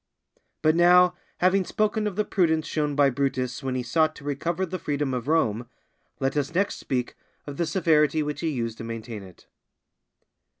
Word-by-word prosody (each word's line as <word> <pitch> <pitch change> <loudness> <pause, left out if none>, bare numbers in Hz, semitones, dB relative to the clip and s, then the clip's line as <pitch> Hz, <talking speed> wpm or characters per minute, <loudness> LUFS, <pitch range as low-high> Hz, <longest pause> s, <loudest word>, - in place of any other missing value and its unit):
But 155 0 +4
now, 180 +1 +6 0.3
having 185 +2 +4
spoken 215 +2 0
of 200 - -4
the 210 - 0
prudence 160 -4 +1
shown 150 -2 -1
by 140 -1 +4
Brutus 130 -1 -2
when 130 -1 -3
he 125 - -1
sought 155 +5 +1
to - - -13
recover 165 +6 -2
the 185 +1 -5
freedom 145 -3 -2
of 125 0 -3
Rome, 120 -8 +1 0.5
let 135 +1 -1
us 145 +2 -2
next 200 +2 +1
speak 125 -2 -2 0.3
of 145 -1 -7
the 170 - 0
severity 155 -3 +2
which 150 -1 -4
he 165 - 0
used 115 -6 -3
to - - -5
maintain 115 -1 -6
it. 95 -2 -15
150 Hz, 180 wpm, -25 LUFS, 130-175 Hz, 0.5 s, now